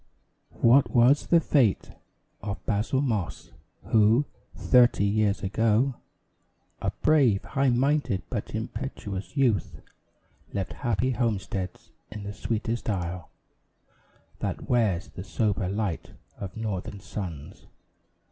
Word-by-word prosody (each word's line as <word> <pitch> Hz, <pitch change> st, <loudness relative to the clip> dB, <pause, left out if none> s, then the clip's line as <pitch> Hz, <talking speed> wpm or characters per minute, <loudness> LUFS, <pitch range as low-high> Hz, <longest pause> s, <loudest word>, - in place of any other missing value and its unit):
What 125 Hz, +4 st, +6 dB
was 125 Hz, +4 st, +4 dB
the 170 Hz, -, +5 dB
fate 130 Hz, -10 st, +2 dB, 0.5 s
Of 100 Hz, +1 st, -5 dB
Basil 115 Hz, +5 st, 0 dB
Moss 110 Hz, -, -2 dB, 0.3 s
who, 110 Hz, +5 st, +4 dB, 0.3 s
thirty 120 Hz, -5 st, +4 dB
years 105 Hz, 0 st, +1 dB
ago, 115 Hz, +6 st, +2 dB, 0.9 s
A -, -, 0 dB
brave, 135 Hz, -10 st, +4 dB
high 135 Hz, 0 st, +1 dB
minded, 130 Hz, -5 st, +1 dB
but 110 Hz, -3 st, -4 dB
impetuous 110 Hz, -1 st, -5 dB
youth, 120 Hz, -7 st, +1 dB, 0.7 s
Left 95 Hz, -3 st, -3 dB
happy 120 Hz, 0 st, 0 dB
homesteads 100 Hz, -6 st, -3 dB, 0.2 s
in 105 Hz, -1 st, -7 dB
the 100 Hz, 0 st, -5 dB
sweetest 110 Hz, +3 st, -2 dB
isle 90 Hz, -3 st, -3 dB, 1.1 s
That -, -, -4 dB
wears 110 Hz, -8 st, +1 dB
the 90 Hz, -, -8 dB
sober 100 Hz, -3 st, -1 dB
light 100 Hz, -4 st, -3 dB, 0.3 s
of 95 Hz, +2 st, -7 dB
Northern 100 Hz, -3 st, -4 dB
suns? 85 Hz, -7 st, -7 dB
110 Hz, 110 wpm, -27 LUFS, 100-125 Hz, 1.1 s, What